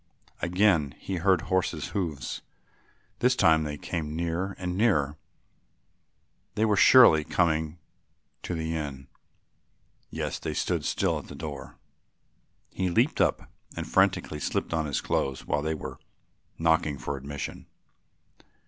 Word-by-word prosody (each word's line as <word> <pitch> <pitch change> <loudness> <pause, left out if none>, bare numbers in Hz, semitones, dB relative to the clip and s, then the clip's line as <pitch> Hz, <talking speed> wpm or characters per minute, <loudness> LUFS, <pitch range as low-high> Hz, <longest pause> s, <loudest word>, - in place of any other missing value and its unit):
Again 85 -5 +2
he 95 - -4
heard 95 -1 +3
horses' 90 -4 -1
hoofs; 85 -9 -3 0.8
this 125 +1 +3
time 80 -7 +4
they 75 -1 -4
came 75 -1 -4
nearer 85 +3 -2
and 90 -1 -3
nearer, 75 -10 +2 1.4
they 110 +1 +2
were 105 -1 +3
surely 100 -7 +7
coming 80 -1 0 0.6
to 90 - -4
the 80 0 -2
inn. 70 -4 -5 1.0
Yes, - - -3
they - - -4
had - - -3
stood - - -1
still - - 0
at - - -12
the - - -9
door. 75 -3 -7 0.9
He 95 0 -1
leaped 115 - +2
up - - 0 0.3
and - - -4
frantically 75 - +2
slipped 75 - -2
on 80 -2 0
his 70 - -1
clothes, 70 -1 -1
while 75 - 0
they 80 +1 -1
were - - -7 0.6
knocking 80 -3 +2
for 65 +2 -4
admission. 70 +1 -6
80 Hz, 135 wpm, -27 LUFS, 75-95 Hz, 1.4 s, surely